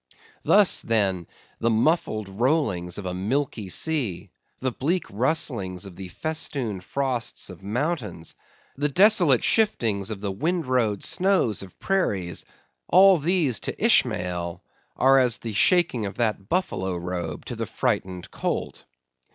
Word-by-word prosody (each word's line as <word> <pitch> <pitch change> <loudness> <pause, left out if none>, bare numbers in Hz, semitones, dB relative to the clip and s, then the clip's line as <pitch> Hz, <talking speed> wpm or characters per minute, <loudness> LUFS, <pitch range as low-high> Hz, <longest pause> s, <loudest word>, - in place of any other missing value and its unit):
Thus, 205 -2 +5
then, 95 -6 0 0.3
the 115 - +1
muffled 110 - +1
rollings 100 - 0
of 105 - -6
a 90 - -3
milky 105 +2 -2
sea; 105 - -2 0.3
the 130 0 -2
bleak 165 +9 -1
rustlings 105 - -1
of 95 -3 -10
the 95 0 -8
festooned 125 - -3
frosts 125 -3 -3
of 90 - -13
mountains; 110 - -3 0.4
the 145 +2 0
desolate 175 - +5
shiftings 115 - +1
of 110 -3 -5
the 100 -1 -3
windrowed 130 - 0
snows 185 - +2
of 95 -2 -12
prairies; 100 - -1 0.4
all 190 0 +7
these, 155 - +1
to - - -3
Ishmael, 85 -1 +1 0.3
are 135 +1 +5
as 125 -2 +3
the 115 -3 -6
shaking 140 - +2
of 100 - -7
that 105 -4 -1
buffalo 95 - -1
robe 85 -3 -5
to - - -5
the - - -4
frightened 90 -2 -2
colt! - - -4
115 Hz, 135 wpm, -24 LUFS, 95-150 Hz, 0.4 s, all